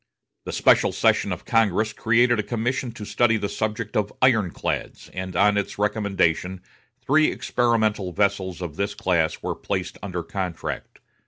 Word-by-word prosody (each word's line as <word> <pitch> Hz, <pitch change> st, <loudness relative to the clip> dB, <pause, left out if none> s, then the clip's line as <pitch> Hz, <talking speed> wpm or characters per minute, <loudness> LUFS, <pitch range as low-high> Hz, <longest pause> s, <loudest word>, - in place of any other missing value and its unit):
The -, -, -4 dB
special -, -, +4 dB
session -, -, +2 dB
of -, -, -5 dB
Congress 110 Hz, -1 st, +2 dB
created 120 Hz, +2 st, +3 dB
a -, -, +3 dB
commission 120 Hz, +4 st, -2 dB
to 110 Hz, -2 st, -8 dB
study 115 Hz, +1 st, +2 dB
the 105 Hz, -, -2 dB
subject 110 Hz, +1 st, -3 dB
of 105 Hz, -1 st, 0 dB
ironclads, 110 Hz, -9 st, 0 dB
and 95 Hz, 0 st, -5 dB
on 105 Hz, +3 st, +4 dB
its 100 Hz, -, -2 dB
recommendation 95 Hz, -4 st, 0 dB, 0.4 s
three 155 Hz, +3 st, +4 dB
experimental 110 Hz, -6 st, 0 dB
vessels 95 Hz, -2 st, 0 dB
of 80 Hz, -3 st, -6 dB
this 100 Hz, 0 st, -2 dB
class 90 Hz, -7 st, 0 dB
were -, -, -1 dB
placed -, -, -4 dB
under 90 Hz, -3 st, -4 dB
contract. 90 Hz, -1 st, -5 dB
105 Hz, 150 wpm, -24 LUFS, 95-115 Hz, 0.4 s, special